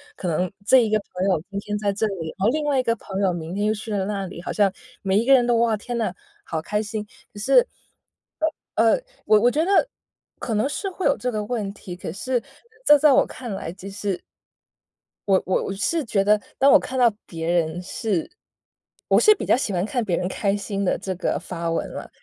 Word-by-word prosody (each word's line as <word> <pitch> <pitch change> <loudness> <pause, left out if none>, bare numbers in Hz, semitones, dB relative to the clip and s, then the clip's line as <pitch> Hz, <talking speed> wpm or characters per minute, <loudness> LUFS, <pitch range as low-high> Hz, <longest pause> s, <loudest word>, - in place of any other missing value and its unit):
可 180 - -3
能 180 +3 0 0.2
这 260 - +6
一 - - -2
个 215 - +3 0.2
朋 180 +1 -1
友 185 -5 +2
今 200 - -3
天 210 +1 -3
在 205 -1 0
这 205 +2 0
里， 175 -6 -4
然 190 - +1
后 - - +5
另 305 +5 0
外 285 -3 +2
一 - - +1
个 230 -2 +1
朋 195 -3 -6
友 190 -3 +2
明 165 0 -5
天 205 +2 -1
又 215 - +2
去 220 +1 -7
了 200 -2 0
那 200 -1 -2
里， 175 -2 -9
好 - - -4
像 200 -2 +3 0.3
每 195 +1 +2
一 230 - 0
个 275 - +6
人 250 -2 +5
都 240 -1 +3
哇， 230 -1 +3
天 240 +3 -5
哪， 225 -2 -1 0.3
好 160 - -3
开 210 +6 -1
心， 215 0 -4 0.3
可 205 - -9
是 - - +4 1.1
呃， 225 0 +4 0.3
我 215 - +6
我 245 +2 +4
觉 305 +5 +1
得 400 +6 +3 0.5
可 230 - -3
能 215 +5 +2
是 390 +7 -3
会 375 0 -5
有 - - +3
这 250 - -2
个 215 -2 -2
问 210 -4 -3
题， 180 -3 -9
可 - - -6
是 245 +5 -1 0.4
这 295 - +8
在 295 +1 +5
我 - - +5
看 240 -5 -7
来， 170 -3 -5
其 195 +1 -9
实 200 -2 -3 1.1
我 190 -1 +4
我 185 - +1
我 - - -3
是 320 +11 0
觉 205 -3 +1
得， 210 +1 +4 0.2
当 275 +1 +5
我 - - +8
看 260 - -5
到 245 -2 +6 0.2
别 165 -1 -5
人 170 0 0
是 185 -1 -2 0.8
我 - - +5
是 430 - +7
比 - - -5
较 - - +4
喜 245 -4 -2
欢 180 +1 0
看 245 +2 -1
别 180 -5 0
人 180 - -1
开 195 +1 0
心 200 0 -3
的 185 - +1
这 190 - -4
个 180 - -1
发 170 -1 -4
文 165 - -1
了。 - - -7
205 Hz, 255 characters per minute, -23 LUFS, 190-235 Hz, 1.1 s, 这